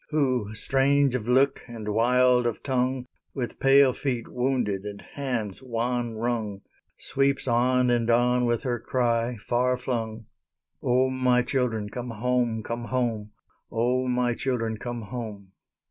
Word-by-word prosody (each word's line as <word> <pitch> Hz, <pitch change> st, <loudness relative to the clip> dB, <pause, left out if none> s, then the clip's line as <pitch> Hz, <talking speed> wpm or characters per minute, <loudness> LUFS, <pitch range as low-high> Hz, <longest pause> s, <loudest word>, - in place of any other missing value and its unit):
Who, 130 Hz, -8 st, 0 dB
strange 135 Hz, +4 st, +2 dB
of 120 Hz, -3 st, -2 dB
look, 135 Hz, +2 st, +3 dB
and 115 Hz, -3 st, -8 dB
wild 125 Hz, +2 st, +3 dB
of 115 Hz, -, -4 dB
tongue, 130 Hz, -1 st, 0 dB, 0.3 s
With 125 Hz, -3 st, -4 dB
pale 135 Hz, -1 st, +6 dB
feet 125 Hz, -4 st, -3 dB
wounded 125 Hz, -6 st, -1 dB
and 105 Hz, -1 st, -6 dB
hands 120 Hz, -8 st, -4 dB
wan 120 Hz, -1 st, -2 dB
wrung, 110 Hz, -3 st, -2 dB, 0.4 s
Sweeps 135 Hz, 0 st, 0 dB
on 125 Hz, +1 st, +3 dB
and 120 Hz, -1 st, +1 dB
on 125 Hz, +1 st, +3 dB
with 120 Hz, -1 st, 0 dB
her 120 Hz, -2 st, -1 dB
cry, 120 Hz, -1 st, 0 dB
far 125 Hz, +4 st, 0 dB
flung, 115 Hz, -3 st, -3 dB, 0.6 s
"O, 130 Hz, +1 st, +2 dB
my 125 Hz, -1 st, +2 dB
children, 120 Hz, -6 st, -1 dB
come 125 Hz, +3 st, -6 dB
home, 120 Hz, 0 st, 0 dB
come 120 Hz, +2 st, -4 dB
home! 115 Hz, -5 st, -2 dB, 0.4 s
O, 125 Hz, +3 st, +1 dB
my 125 Hz, -1 st, +1 dB
children, 115 Hz, -3 st, -2 dB
come 120 Hz, -2 st, -5 dB
home!" 105 Hz, -4 st, -7 dB
125 Hz, 140 wpm, -26 LUFS, 115-125 Hz, 0.6 s, pale